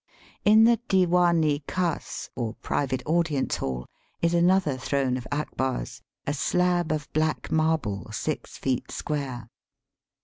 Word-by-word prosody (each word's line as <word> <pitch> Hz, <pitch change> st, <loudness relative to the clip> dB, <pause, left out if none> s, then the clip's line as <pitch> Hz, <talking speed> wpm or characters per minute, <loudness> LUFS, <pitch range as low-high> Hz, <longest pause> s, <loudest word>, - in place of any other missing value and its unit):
In 215 Hz, +1 st, +7 dB
the 230 Hz, -1 st, +5 dB
Diwan 175 Hz, -3 st, +4 dB
i 145 Hz, -1 st, +1 dB
khas, 180 Hz, -3 st, -2 dB
or 115 Hz, -2 st, -3 dB
private 130 Hz, -2 st, -2 dB
audience 160 Hz, -3 st, +1 dB
hall, 65 Hz, -1 st, -3 dB, 0.3 s
is 170 Hz, 0 st, +1 dB
another 175 Hz, -3 st, +3 dB
throne 130 Hz, -1 st, 0 dB
of 125 Hz, -1 st, -5 dB
Abkar's, 130 Hz, -4 st, -2 dB, 0.2 s
a 145 Hz, -, 0 dB
slab 175 Hz, +3 st, +1 dB
of 150 Hz, -2 st, -2 dB
black 155 Hz, 0 st, 0 dB
marble 155 Hz, -, 0 dB
six -, -, -4 dB
feet 130 Hz, -2 st, -1 dB
square. 135 Hz, -6 st, -4 dB
150 Hz, 130 wpm, -26 LUFS, 130-175 Hz, 0.3 s, In